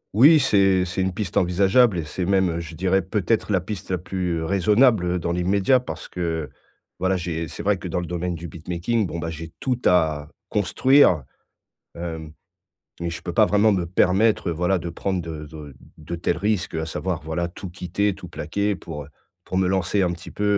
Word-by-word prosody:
Oui, 150 +8 +8
c'est 95 -7 +3
c'est 90 +1 -2
une 95 0 0
piste 95 -1 -4
envisageable 95 +4 +4
et 80 - -2
c'est 90 +4 -3
même, 95 -1 +2
heu, 85 - -3
je 85 -1 -7
dirais 95 +3 +2
peut-être 105 +3 -1
la 95 - +3
piste 100 +2 -7
la 90 - 0
plus, 90 0 -3
heu, - - -3
raisonnable 100 0 +3
dans 85 0 -2
l'immédiat 95 +8 +2
parce 125 - -7
que, 80 -3 -3 0.5
voilà, 95 +1 +1
j'ai 85 -2 -3
c'est - - -7
vrai 100 -2 +1
que 90 - -6
dans 90 +1 -1
le 90 - -4
domaine 90 +1 -3
du 85 +1 -7
beatmaking, 90 +7 -2
bon 85 - -5
bah, 85 0 -3
j'ai 80 +1 -8
tout 125 -2 -1
à 80 -4 +2 0.2
construire. 105 - +4 0.7
Hem, 80 -2 -6 0.7
mais 85 - -1
je 85 - -5
peux - - -4
pas - - +5
vraiment 105 +1 +4
me 90 -4 0
permettre, 95 +3 +2
heu, - - 0
voilà 90 +3 +1
de 85 -1 -5
prendre 95 +2 -2
de 80 -2 -6
de 75 -2 -10 0.2
de 80 +2 -6
tels 85 - -1
risques, 100 -3 -1
à 80 0 -2
savoir, 85 -1 -3
voilà, 85 +2 -2
tout 90 +1 -9
quitter, 95 +4 -1
tout - - -10
plaquer 100 0 -2
pour, 75 -5 -8
heu, - - -17 0.4
pour 95 - -3
me 95 -1 +2
lancer 95 +1 +1
un 90 - +1
petit 85 0 -10
peu, 105 - -5
90 Hz, 205 wpm, -23 LUFS, 85-100 Hz, 0.7 s, Oui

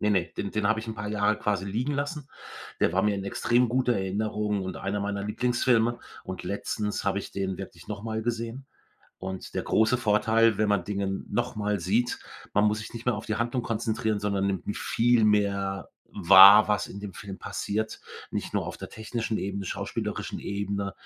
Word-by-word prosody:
ne, 105 - +2
ne, 95 -4 +2
den 100 - -3
den 105 -1 +1
habe 110 0 +2
ich 110 - -9
'n 110 - -4
paar 105 -1 -5
Jahre 105 0 +1
quasi 100 -2 -1
liegen 120 +9 -1
lassen. 145 0 -3 0.5
Der - - +3
war 95 +2 +2
mir 105 -1 +2
in 95 - -4
extrem 120 +4 +2
guter 125 0 +2
Erinnerung 105 +1 -1
und 95 0 -5
einer 100 +1 -2
meiner 100 0 -2
Lieblingsfilme 120 +1 +1 0.3
und 95 -1 -6
letztens 105 +1 -3
habe 100 0 +1
ich - - -7
den 95 -2 -2
wirklich 90 -3 -9
noch 105 -1 -5
mal 110 -1 -2
gesehen 115 +3 -3 0.5
und 95 0 -6
der - - -1
große 110 +3 +2
Vorteil, 110 0 +3
wenn 110 -1 +2
man 100 -2 +2
Dinge 100 -1 -2 0.2
noch - - -1
mal 105 -1 0
sieht, 105 +8 0 0.4
man 105 - +4
muss 105 0 +2
sich 110 - -8
nicht 115 +1 -8
mehr 125 - +3
auf 110 - -6
die 105 - -1
Handlung 120 +2 -1
konzentrieren, 110 -2 -1
sondern 100 -1 0
nimmt 95 -3 -3
m 105 - -2
viel 120 -1 +2
mehr 100 -2 +1 0.2
wahr, 100 +4 +9
was 105 -1 0
in - - -8
dem 100 -1 -7
Film 95 0 -8
passiert, 110 +2 -3 0.3
nicht - - -3
nur - - -1
auf - - -5
der - - -8
technischen 110 0 -3
Ebene, 100 0 -3
schauspielerischen - - -4
Ebene 100 0 -3
105 Hz, 200 wpm, -27 LUFS, 100-115 Hz, 0.5 s, wahr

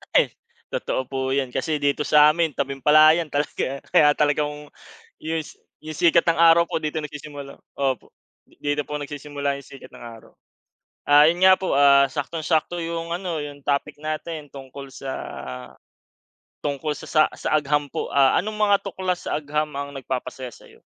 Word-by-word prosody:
Eh, - - +6 0.4
totoo - - -2
po 135 -1 -4
yan, 135 -2 -1
kasi 150 +3 -1
dito 145 +1 0
sa 150 0 +6
amin, 165 0 0
tabing-palayan, 150 +4 +3
talaga 145 -2 -2
kaya 150 -1 +6
talagang 150 0 -1 0.5
yus 160 -1 -4 0.3
yung 155 0 -7
sikat 170 -1 +5
ng 165 -1 +3
araw 170 0 +6
po - - -1
dito 155 +1 -2
nagsisimula 145 -2 -9 0.2
opo, 135 -3 -2 0.3
di - - -26
dito 145 0 -1
po 150 0 -4
nagsisimula 145 -1 -4
'yong 140 - -12
sikat 135 - -12
ng - - -14
araw. 115 -1 -12 0.8
Ah, 145 +1 +7
'yon 170 +2 +1
nga 190 - +8
po, 190 - -2
ah, 140 0 +6
saktong-sakto 155 +4 -2
'yong 165 0 -4
ano, 175 -4 -4
'yong 145 -1 -9
topic 140 -1 -1
natin 155 0 -5
tungkol 135 0 -10
sa 135 0 -6 1.5
tungkol 145 +1 -2
sa - - -10
sa 155 - +3 0.2
sa - - -3
agham 145 -1 +1
po. - - -4
Ah, 135 -1 +4
anong 215 +2 -5
mga 205 -1 +4
tuklas 185 -2 -3
sa - - -1
agham 150 +1 -2
ang 140 0 -6
nagpapasaya 130 -1 -5
sa'yo? - - -18
150 Hz, 165 wpm, -23 LUFS, 140-160 Hz, 1.5 s, nga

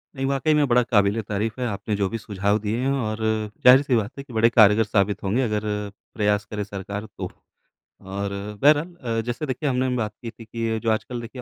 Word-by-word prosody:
नहीं, 135 0 -2
वाक़ई 140 +3 +1
में 150 -1 +3
बड़ा 125 0 +4
क़ाबिले 105 -1 +2
तारीफ़ 110 +4 -3
है, - - 0
आपने 105 0 -3
जो 100 -1 0
भी 115 - -3
सुझाव 100 -1 0
दिए 110 +2 -2
हैं 135 +2 0
और 110 -5 -2 0.5
ज़ाहिर-सी 130 0 +7
बात 105 -2 0
है 140 - -6
कि 125 - -14
बड़े 115 +1 +4
कारगर 110 -1 +6
साबित 100 -1 0
होंगे, 105 +7 +1
अगर 105 -4 0 0.5
प्रयास 105 -1 +1
करे 105 -1 -4
सरकार 100 +1 -6
तो। - - -7 0.7
और 100 +1 -4 0.3
बहरहाल 150 +4 +4
अ, 115 -7 -2
जैसे 120 +5 -3
देखिए 140 +2 -2
हमने 130 0 0
बात 110 -3 -1
की 115 - -4
थी 115 - -13
कि 115 0 -2
जो 115 - +1
आजकल 120 +2 -2
देखिए 125 +2 -8
115 Hz, 210 wpm, -23 LUFS, 105-125 Hz, 0.7 s, ज़ाहिर-सी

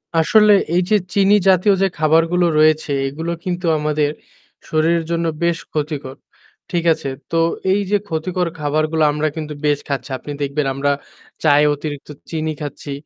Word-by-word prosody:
আসলে 210 +6 +5 0.2
এই 180 - +4
যে 215 - +4 0.2
চিনি 200 +1 +4
জাতীয় 190 +2 +5
যে 195 - +4
খাবারগুলো 165 +3 +3
রয়েছে, 155 -1 +3 0.2
এগুলো 160 +5 -4
কিন্তু 180 -1 -3
আমাদের 150 -1 0 0.6
শরীরের 165 +1 +2
জন্য 170 0 0 0.2
বেশ 170 -1 +2 0.2
ক্ষতিকর, 145 -3 -3 0.6
ঠিক 170 -2 0
আছে? 140 - -6 0.2
তো 165 - +1 0.3
এই 205 - +1
যে 205 - +4
ক্ষতিকর 175 +2 -1
খাবারগুলো 155 +2 0
আমরা 150 +1 -1
কিন্তু 155 -1 -5
বেশ 145 -1 +2
খাচ্ছি। 135 -1 -3
আপনি 145 - -9
দেখবেন 140 +1 -1
আমরা 140 +1 0 0.5
চায়ে 150 -1 +5
অতিরিক্ত 145 -1 -7 0.2
চিনি 160 -1 -2
খাচ্ছি, 145 0 -6
155 Hz, 150 wpm, -19 LUFS, 150-170 Hz, 0.6 s, আসলে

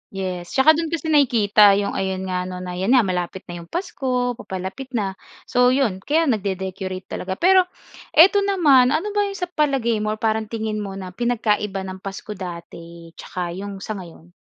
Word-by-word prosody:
Yes, 180 -2 -4
'tsaka 265 +4 +7
do'n 325 +1 0
kasi 320 -1 -3
nakikita 215 -8 +5
'yong 200 0 -1
ayon 190 -1 -2
nga, 180 0 -2
'no, 180 0 -6
na 180 0 -5
'yan 205 +8 +3
nga, 250 - +5
malapit 180 -1 -3
na 175 -1 -8
'yong 170 - -12
Pasko, 260 - -2
papalapit 190 +8 -6
na, 195 -4 -2 0.2
so 250 0 +3
'yon, 250 -7 +1
kaya 305 +11 +1
nagde-decorate 190 - -2
talaga. 190 0 -4
Pero 370 - +4 0.5
ito 375 +6 +7
naman, 300 -10 +4
ano 410 +7 -2
ba 410 0 +1
'yong 395 - -6
sa 360 -2 -4
palagay 270 -8 +1
mo 215 0 -1
or - - -20
parang 220 0 0
tingin 220 -1 -3
mo 200 -2 -5
na 190 -1 -7
pinagkaiba 210 -3 -1
ng 190 0 -7
Pasko 195 +2 -7
dati 170 -3 -9
'tsaka 175 -1 -5
'yong 200 -1 -7
sa 215 -2 -5
ngayon? 170 -1 -13
210 Hz, 185 wpm, -22 LUFS, 185-270 Hz, 0.5 s, tsaka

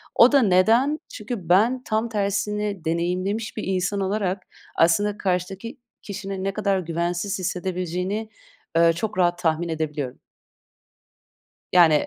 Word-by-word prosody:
O 235 - +7
da 280 -1 +5
neden? 230 +9 +4
Çünkü 210 -6 -6
ben, 235 +8 +4
tam 220 +2 -1
tersini 205 -2 -1
deneyimlemiş 185 +7 -1
bir 215 - -3
insan 190 +1 -1
olarak 195 -1 -1 0.3
aslında 205 +5 +3
karşıdaki 190 +4 -3 0.2
kişinin 195 -1 -5
ne 195 0 -1
kadar 200 -2 +1
güvensiz 175 +3 -2
hissedebileceğini, 185 +3 -2 0.5
eee, 165 0 +5
çok 200 +4 -4
rahat 175 -1 +2
tahmin 170 0 0
edebiliyorum. 150 -5 -3 1.5
Yani, 165 -4 +5
190 Hz, 120 wpm, -24 LUFS, 175-210 Hz, 1.5 s, O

